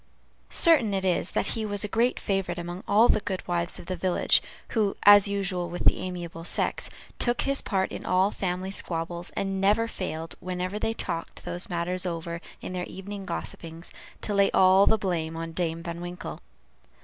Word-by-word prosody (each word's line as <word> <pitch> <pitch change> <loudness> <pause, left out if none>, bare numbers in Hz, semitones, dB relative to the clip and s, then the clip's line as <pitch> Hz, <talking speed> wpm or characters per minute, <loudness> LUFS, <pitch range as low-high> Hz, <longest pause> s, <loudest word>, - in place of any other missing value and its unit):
Certain 255 -12 +5
it 190 0 -1
is, 180 -1 +1
that - - +1
he 225 - -2
was 205 -1 -1
a - - -1
great 230 +4 +1
favorite 195 -3 -1
among 175 +2 -5
all 215 +4 +6
the - - +4
good 190 -2 -4
wives 175 -1 0
of - - -10
the 185 - -3
village, 180 0 +3 0.3
who, 210 -4 +1
as 205 0 +9
usual 190 -3 -2
with 175 - -5
the - - +5
amiable 175 -2 -5
sex, - - 0 0.3
took 240 0 +2
his 275 0 +2
part 190 -2 0
in - - -6
all 185 +2 +2
family 185 -1 -3
squabbles, 170 -2 -2
and 195 -1 -1
never 210 +4 +3
failed, 165 -6 -5
whenever 185 +2 -3
they 225 +1 -1
talked 170 -5 -4
those 175 +6 -2
matters 180 +1 -1
over 170 -1 -4 0.2
in - - -6
their 180 -1 -2
evening 195 +1 -7
gossipings, 165 - -5 0.3
to 210 - -2
lay 200 0 +4
all 190 +1 +6
the 220 - +5
blame 165 -5 -2
on 165 0 -4
Dame 165 -1 -2
Van 170 0 -5
Winkle. 175 +1 -6
185 Hz, 185 wpm, -27 LUFS, 175-200 Hz, 0.3 s, as